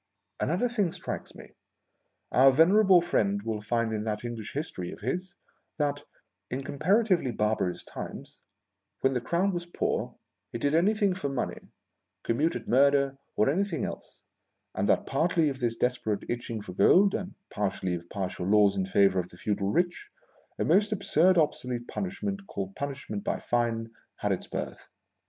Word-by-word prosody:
Another 185 +10 +1
thing 210 -8 0
strikes - - -5
me. - - -12 0.8
Our 130 +2 +7
venerable 185 +5 +6
friend 100 -11 +1
will 110 -1 -3
find 115 +1 0
in 105 -1 -2
that 105 +1 -3
English 115 -3 -5
history 135 - -4
of - - -11
his, 180 0 -3 0.4
that, 145 -1 -1 0.4
in 130 +2 -3
comparatively 180 - +2
barbarous 105 -5 -1
times, - - -8 0.6
when 135 - +3
the 125 - -1
Crown 185 +9 +1
was 175 0 -4
poor, 175 - -2 0.4
it - - -2
did 145 +1 +1
anything 200 +4 +3
for 180 -6 -3
money 135 -2 -4 0.2
— - - -55
commuted 150 +8 0
murder, 140 +1 +3 0.2
or 105 - +3
anything 175 +3 0
else - - -9 0.3
— - - -53
and - - -1
that, - - +3
partly 160 +2 +2
of 135 -2 -5
this 120 -3 0
desperate 120 -5 -1
itching 120 -2 -3
for 95 -3 -8
gold, 190 - +5
and 190 -1 -4 0.2
partly 100 -3 -1
of 85 0 -6
palatial 95 -2 -3
laws 100 -1 +5
in 95 -1 -1
favor 95 -1 +4
of 90 0 -4
the 90 - -15
feudal 100 0 -1
rich, 175 - 0 0.5
a - - 0
most 210 +2 +3
absurd 185 -3 +3
obsolete 125 -6 0
punishment, 195 +1 -4
called 95 -1 -5
puaishment 140 -7 -5
by - - -1
fine, 115 -1 -1 0.2
had - - -2
its - - -2
birth. - - -6
135 Hz, 165 wpm, -28 LUFS, 105-175 Hz, 0.8 s, Our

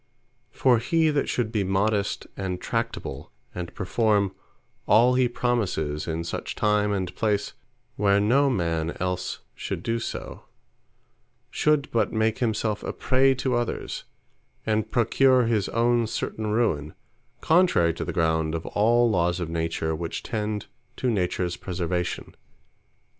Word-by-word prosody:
For 120 +1 +3
he 160 +6 +2
that 145 -2 0
should 115 -3 -1
be 105 -4 0
modest, 100 +2 0
and 95 -2 -3
tractable, - - -4 0.2
and 90 -1 -5
performe 105 0 +1 0.5
all 120 +4 +5
he 125 0 +3
promises, 100 -12 -1
in 80 0 -2
such 85 - -4
time, 105 -1 +2
and 95 -3 -2
place, 105 -2 0 0.4
where 100 0 +3
no 130 +7 +3
man 85 -7 -1
els 90 0 -2
should - - -5
do 115 0 0
so, - - -6 1.1
should 150 -1 +2
but 110 -3 +1
make 110 0 +1
himselfe 110 -3 0
a - - -3
prey 135 +1 +3
to 130 0 -1
others, 120 -1 -2 0.6
and 110 0 0
procure 130 +2 +4
his 110 -4 +1
own 120 0 +2
certain 110 0 -3
ruine, 105 -10 0 0.4
contrary 160 - +3
to - - -4
the - - -3
ground 80 -2 +1
of 80 - -4
all 120 +3 +3
Lawes 90 -4 +1
of 85 -2 -3
Nature, 80 -1 -1
which 85 +1 -4
tend 105 -2 -3 0.3
to 125 - 0
Natures 90 -3 -1
preservation. 90 -1 -3
105 Hz, 135 wpm, -25 LUFS, 90-120 Hz, 1.1 s, all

